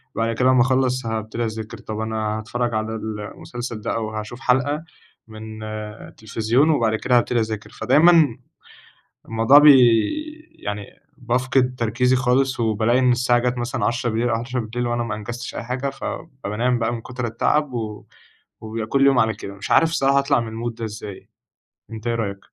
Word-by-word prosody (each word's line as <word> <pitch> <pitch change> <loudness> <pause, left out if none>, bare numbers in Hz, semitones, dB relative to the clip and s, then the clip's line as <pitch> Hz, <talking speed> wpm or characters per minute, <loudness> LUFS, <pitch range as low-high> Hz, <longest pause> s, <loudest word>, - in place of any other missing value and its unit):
وبعد 115 0 0
كده 125 +3 +3
لما 130 -1 +5
أخلّص 130 0 +1
هابتدي 110 +1 -3
أذاكر، 110 -1 -6
طب 110 0 -6
أنا 110 -1 -2
هاتفرج 120 +2 -2
على 110 +1 -2
المسلسل 110 +2 -6
ده - - -2
أو 110 -1 -2
هاشوف 110 +3 -6
حلقة 140 +4 +1 0.4
من 110 0 -9
التلفزيون، 110 +4 -1
وبعد 115 -8 +2
كده 125 +3 +2
هابتدي 120 0 +1
أذاكر، 110 -1 -3
فدايمًا 150 +2 +4 0.9
الموضوع 115 +5 +5
بي 150 0 +9 0.9
يعني، 105 0 -4 0.3
بافقد 125 0 +1
تركيزي 125 +3 +1
خالص، 130 +1 +1
وبالاقي 115 +2 +2
إن 125 -1 +4
الساعة 120 0 +2
جَت 125 0 -1
مثلًا 120 0 -2
22:00 120 0 0
أو 115 - +1
23:00 120 0 -3
وأنا 120 0 -1
ما 110 -2 -3
أنجزتش 120 +3 -6
أي - - -4
حاجة، 125 +3 -2
ف - - -12 0.4
فبانام 120 +4 0
بقى 115 0 0
من 115 - -5
كُتر 125 +1 -5
التَّعب، 130 +5 0
و 110 -3 -5 0.6
وبيبقى 110 0 -5
كل 135 +3 +3
يوم 135 -2 +5
على 110 -1 +2
كده، 100 -1 -8
مش 100 +2 -7
عارف 165 - +5
الصراحة 140 -4 +2
أطلَع 140 -1 +2
من 115 - -4
المود 115 +1 -5
ده 115 - -5
إزاي، 105 -2 -8 0.6
أنت 110 +1 -7
إيه 115 - +1
رأيك؟ 100 -4 -3
120 Hz, 170 wpm, -22 LUFS, 110-125 Hz, 0.9 s, بي